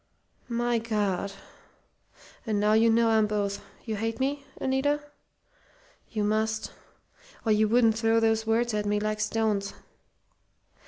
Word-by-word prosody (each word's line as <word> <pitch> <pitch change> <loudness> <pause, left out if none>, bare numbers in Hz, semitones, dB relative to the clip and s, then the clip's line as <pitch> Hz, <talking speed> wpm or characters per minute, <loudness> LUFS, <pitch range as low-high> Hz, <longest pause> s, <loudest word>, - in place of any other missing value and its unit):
"My 240 0 0
God! 205 -4 -1 1.1
And 210 -2 0
now 210 +1 +3
you 225 +1 +5
know 230 0 +4
I'm 220 -1 +3
both, 205 -1 -2 0.2
you 220 -3 -3
hate 225 +3 -3
me, 280 +2 -1 0.2
Anita? 270 +3 +1 1.1
You 215 -2 -2
must, 220 +1 0 0.7
or 220 - +2
you 215 0 +4
wouldn't 225 -1 +3
throw 225 0 +3
those 225 0 +1
words 230 +1 +1
at 210 -1 -1
me 205 0 +1
like 215 0 -2
stones." 215 -2 -1
220 Hz, 130 wpm, -27 LUFS, 210-230 Hz, 1.1 s, you